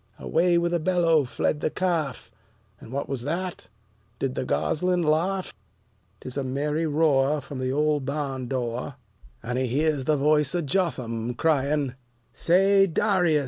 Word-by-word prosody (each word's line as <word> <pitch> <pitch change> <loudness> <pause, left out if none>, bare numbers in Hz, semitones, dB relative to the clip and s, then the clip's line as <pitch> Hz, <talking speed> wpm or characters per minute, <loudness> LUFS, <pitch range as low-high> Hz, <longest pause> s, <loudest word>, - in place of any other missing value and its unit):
Away 175 +1 +2
with 170 0 0
a 175 - +2
bellow 165 -3 +3
fled 150 +4 -1
the - - 0
calf; 165 -9 -2 0.5
And 110 - -12
what 140 +2 -3
was 135 -3 -3
that? 165 - -4 0.5
Did 135 0 -2
the 130 - -3
gosling 180 +6 0
laugh? 175 +5 0 0.7
'Tis 130 +1 -7
a 140 - 0
merry 150 +5 -1
roar 150 -1 +2
from 145 -3 -8
the 130 0 -1
old 150 0 +1
barn 135 -2 -3
door, 125 +1 -3 0.5
And 125 +2 -2
he 130 - 0
hears 145 +2 0
the 155 +1 +2
voice 150 +1 +2
of 170 -3 -1
Jotham 125 -8 -1
crying, 145 -2 +1 0.4
"Say, 195 +3 +4
D'rius! 175 -3 +2
150 Hz, 150 wpm, -25 LUFS, 130-170 Hz, 0.7 s, Say